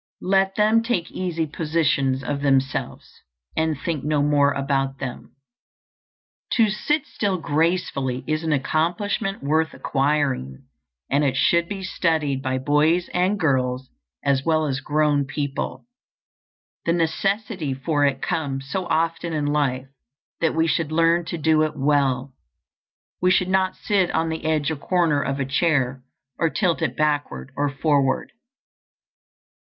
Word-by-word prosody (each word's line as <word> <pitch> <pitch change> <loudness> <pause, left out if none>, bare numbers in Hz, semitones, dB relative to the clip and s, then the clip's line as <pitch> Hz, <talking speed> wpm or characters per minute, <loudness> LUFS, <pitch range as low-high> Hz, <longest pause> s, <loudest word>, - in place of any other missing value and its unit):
Let 195 0 +2
them 215 +2 +4
take 230 -8 -2
easy 170 -3 -2
positions 150 -4 0
of 140 +2 -3
themselves, 135 -2 -1 0.3
and 160 -3 0
think 160 -3 -3
no 150 -1 +1
more 145 -1 +3
about 135 -1 -1
them. 130 -2 -7 1.2
To 225 -4 +4
sit 295 +8 0
still 200 -3 -1
gracefully 155 -5 0
is 155 +1 -1
an 160 - -1
accomplishment 175 - -1
worth 160 +3 +1
acquiring, 135 - -1 0.5
and 140 +2 +3
it 135 -2 +1
should 170 +4 +3
be 195 -2 -5
studied 155 -7 0
by 130 -1 -1
boys 150 +6 +2
and 185 +3 +1
girls 130 -4 0 0.3
as 140 -1 +2
well 155 0 +2
as 135 -2 -1
grown 150 -1 +1
people. 140 0 -4 1.0
The 170 - +3
necessity 175 - -1
for 145 +2 0
it 135 -2 +1
comes 135 -3 -2
so 185 +1 -2
often 165 0 0
in 150 -2 -1
life 140 -3 0 0.5
that 165 -1 +1
we 160 0 +3
should 160 -1 0
learn 165 +1 +3
to 170 - -4
do 160 0 +3
it 155 -1 +1
well. 135 -2 +1 0.9
We 180 - +4
should 185 0 +2
not 185 0 +1
sit 195 -4 +1
on 165 0 +1
the 160 0 -4
edge 155 -1 +1
or 160 - -3
corner 165 -2 +1
of 135 0 -2
a 135 - 0
chair, 135 -3 +1 0.4
or 165 - +2
tilt 175 -1 0
it 160 - -1
backward 145 - -1
or 145 0 0
forward. 140 -1 +1
155 Hz, 145 wpm, -23 LUFS, 140-170 Hz, 1.2 s, them